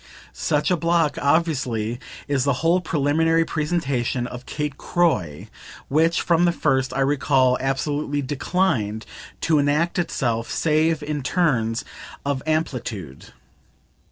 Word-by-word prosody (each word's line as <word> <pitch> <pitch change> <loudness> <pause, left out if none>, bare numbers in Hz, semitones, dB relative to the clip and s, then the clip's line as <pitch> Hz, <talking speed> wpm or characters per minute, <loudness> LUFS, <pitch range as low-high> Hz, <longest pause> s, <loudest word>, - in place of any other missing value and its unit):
Such 150 +5 0
a - - +4
block, 165 -1 +1
obviously, 130 -7 0 0.3
is 140 -3 +1
the 140 0 +2
whole 175 +2 +4
preliminary 165 +1 +2
presentation 140 -7 -1
of 125 0 -8
Kate 150 -2 -3
Croy, 150 - 0 0.4
which, 160 +4 +2
from 170 0 +3
the 175 - +4
first, 135 -6 0
I 135 - +1
recall, 135 -2 +3
absolutely 145 +2 -1
declined 130 - -1 0.4
to 155 -3 +3
enact 150 +5 +1
itself 120 -9 -1
save 155 0 +1
in 150 -1 -3
terms 125 -7 0 0.4
of 140 -2 -1
amplitude. 125 - -3
145 Hz, 120 wpm, -23 LUFS, 130-165 Hz, 0.4 s, a